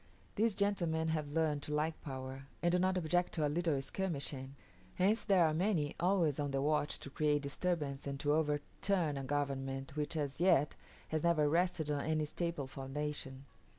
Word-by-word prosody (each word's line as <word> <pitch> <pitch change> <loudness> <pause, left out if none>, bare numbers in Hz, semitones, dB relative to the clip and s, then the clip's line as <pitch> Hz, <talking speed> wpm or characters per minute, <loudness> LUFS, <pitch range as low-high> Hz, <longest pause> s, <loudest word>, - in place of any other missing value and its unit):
These 220 -1 +2
gentlemen 170 -6 +1
have 150 -2 -2
learned 155 -3 +1
to 150 +1 -3
like 155 +1 -1
power, 135 -1 -6 0.2
and 175 - +4
do 180 - +3
not 185 +1 +2
object 175 +1 +1
to 155 -3 +1
a - - +3
little 160 -1 +1
skirmishing. 140 -7 -3 0.4
Hence 205 +5 +2
there 190 -5 +5
are 155 - +2
many 165 -4 +1
always 170 -5 +2
on 145 -1 0
the 135 0 0
watch 150 +1 +1
to 140 - -8
create 150 0 +1
disturbance 145 -2 -2
and 140 -1 -3
to 145 0 +2
overturn 155 +2 0
a 135 - -3
government 135 -1 -2
which 150 +2 -2
as 145 -2 -2
yet 170 -5 +4 0.4
has 155 -1 0
never 165 -3 +3
rested 165 -1 +1
on 145 -1 0
any 155 -1 +1
staple 170 -2 -2
foundation. 135 0 -4
150 Hz, 180 wpm, -35 LUFS, 140-170 Hz, 0.4 s, there